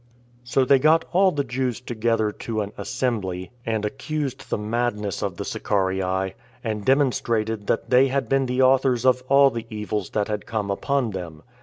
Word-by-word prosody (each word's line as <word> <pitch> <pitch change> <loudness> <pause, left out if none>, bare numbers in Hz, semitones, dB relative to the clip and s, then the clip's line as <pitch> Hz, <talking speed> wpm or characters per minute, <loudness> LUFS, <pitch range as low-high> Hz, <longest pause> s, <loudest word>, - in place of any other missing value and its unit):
So 130 +2 +1
they 135 +1 +5
got 155 +4 +4
all 190 +1 +4
the 145 -3 -1
Jews 125 -1 -2
together 115 -3 0
to 110 0 -4
an 100 0 -4
assembly, 95 -7 -3 0.2
and 110 -2 0
accused 140 +4 -4
the - - 0
madness 105 -2 -2
of - - -3
the - - -4
Sicarii, 95 -1 -1 0.3
and 110 -3 -3
demonstrated 115 -5 +1
that 120 - -1
they 130 +2 +6
had 135 +1 -1
been 135 -1 +2
the 125 +1 +2
authors 130 -2 +3
of 130 -1 +4
all 140 0 +6
the 115 0 -5
evils 105 -3 -3
that 105 -1 -1
had 105 -2 -4
come 105 -3 -2
upon 130 +3 0
them. 85 -5 -7
115 Hz, 175 wpm, -24 LUFS, 105-130 Hz, 0.3 s, they